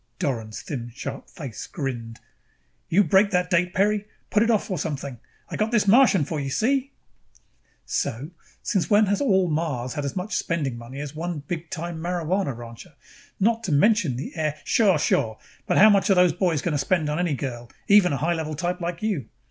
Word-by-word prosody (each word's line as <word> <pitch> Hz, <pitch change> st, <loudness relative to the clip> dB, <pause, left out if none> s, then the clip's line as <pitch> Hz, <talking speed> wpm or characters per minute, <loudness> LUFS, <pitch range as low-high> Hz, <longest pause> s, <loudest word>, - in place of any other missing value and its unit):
Doran's 115 Hz, -5 st, -3 dB
thin 120 Hz, -5 st, -5 dB
sharp -, -, -6 dB
face 140 Hz, -, -8 dB
grinned. 120 Hz, -7 st, -5 dB, 0.7 s
"You 195 Hz, +5 st, +4 dB
break 190 Hz, +4 st, +4 dB
that 180 Hz, -1 st, 0 dB
date, 180 Hz, +1 st, +2 dB
Peri. 205 Hz, +2 st, +1 dB, 0.2 s
Put 210 Hz, -, +3 dB
it 230 Hz, -, +3 dB
off 220 Hz, -2 st, +1 dB
or 180 Hz, -, -1 dB
something. 140 Hz, -5 st, -4 dB, 0.3 s
I -, -, -5 dB
got 215 Hz, +1 st, 0 dB
this 225 Hz, -3 st, +2 dB
Martian 220 Hz, -, +5 dB
for 155 Hz, +1 st, -3 dB
you, 135 Hz, -1 st, -3 dB
see?" 270 Hz, -, 0 dB, 0.9 s
"So? 135 Hz, +9 st, -3 dB, 0.3 s
Since 195 Hz, -5 st, 0 dB
when 210 Hz, 0 st, +5 dB
has 200 Hz, +4 st, 0 dB
all 190 Hz, -9 st, +3 dB
Mars 150 Hz, -6 st, -2 dB
had 145 Hz, -, -3 dB
as 140 Hz, -, -4 dB
much 190 Hz, +3 st, -3 dB
spending 145 Hz, -7 st, -1 dB
money 120 Hz, +4 st, -9 dB
as 145 Hz, -2 st, -6 dB
one 165 Hz, 0 st, -4 dB
big 170 Hz, -1 st, -4 dB
time 170 Hz, -1 st, -5 dB
marijuana 175 Hz, -4 st, -1 dB
rancher? 115 Hz, -1 st, -11 dB, 0.4 s
Not 230 Hz, +3 st, +2 dB
to 180 Hz, -, -2 dB
mention 160 Hz, -, +3 dB
the 130 Hz, -, -6 dB
heir 155 Hz, -2 st, -1 dB
ap -, -, -21 dB
" -, -, -26 dB
"Sure, 200 Hz, -7 st, +4 dB
sure. 110 Hz, -6 st, +1 dB, 0.3 s
But -, -, +2 dB
how 215 Hz, +2 st, +8 dB
much 200 Hz, 0 st, +3 dB
are 195 Hz, -, +5 dB
those 180 Hz, -2 st, +5 dB
boys 170 Hz, -4 st, 0 dB
going 175 Hz, -, 0 dB
to 145 Hz, -, 0 dB
spend 155 Hz, +2 st, +1 dB
on 150 Hz, +2 st, -1 dB
any 175 Hz, -5 st, 0 dB
girl, 120 Hz, -3 st, -5 dB, 0.2 s
even 200 Hz, -3 st, +6 dB
a 140 Hz, -, 0 dB
high 165 Hz, +6 st, 0 dB
level 155 Hz, -2 st, -3 dB
type 175 Hz, +3 st, -2 dB
like 170 Hz, +2 st, -4 dB
you? 185 Hz, -, -1 dB
170 Hz, 205 wpm, -24 LUFS, 140-195 Hz, 0.9 s, how